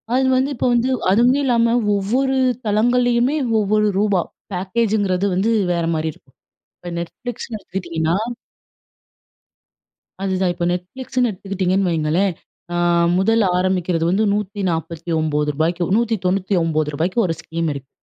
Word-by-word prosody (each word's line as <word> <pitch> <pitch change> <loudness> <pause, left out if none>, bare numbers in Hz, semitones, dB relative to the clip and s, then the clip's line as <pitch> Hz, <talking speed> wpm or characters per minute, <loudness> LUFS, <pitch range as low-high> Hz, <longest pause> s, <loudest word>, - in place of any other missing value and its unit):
அது 265 - +3
வந்து, 265 +2 +1
இப்போ 245 - 0
வந்து 240 +2 +2 0.2
அதுவுமே 245 +7 +4
இல்லாம, 235 -2 +3 0.2
ஒவ்வொரு 255 +7 0 0.3
தளங்கள்லயுமே 245 +5 +2 0.2
ஒவ்வொரு 210 +1 +2
ரூபா 205 -4 +2 0.3
பேக்கேஜுங்கிறது 200 0 0
வந்து 210 +5 +1 0.2
வேற 170 -1 0
மாரி 160 0 -1
இருக்கும். 135 - -26 0.4
இப்ப 175 - -8
Netflixன்னு 225 +5 -6
எடுத்துக்கிட்டிங்கன்னா 170 -4 -2 2.1
அதுதான், 190 -1 0
இப்போ 175 - -3
Netflixனு 245 +7 -2
எடுத்துக்கிட்டிங்கன்னு 190 -1 -1
வைங்களேன். 165 +4 +1 0.4
ஆ - - 0 0.4
முதல் 225 +4 +3
ஆரம்பிக்கிறது 180 -2 0
வந்து 205 +4 +2
ரூ. 205 - +2 0.2
149கு 160 -2 -1
ரூ. - - -5
199கு 180 -6 0
1 165 - -1
ஸ்கீம் 165 0 -3
இருக்கு. 135 -1 -8
190 Hz, 115 wpm, -20 LUFS, 170-225 Hz, 2.1 s, அதுவுமே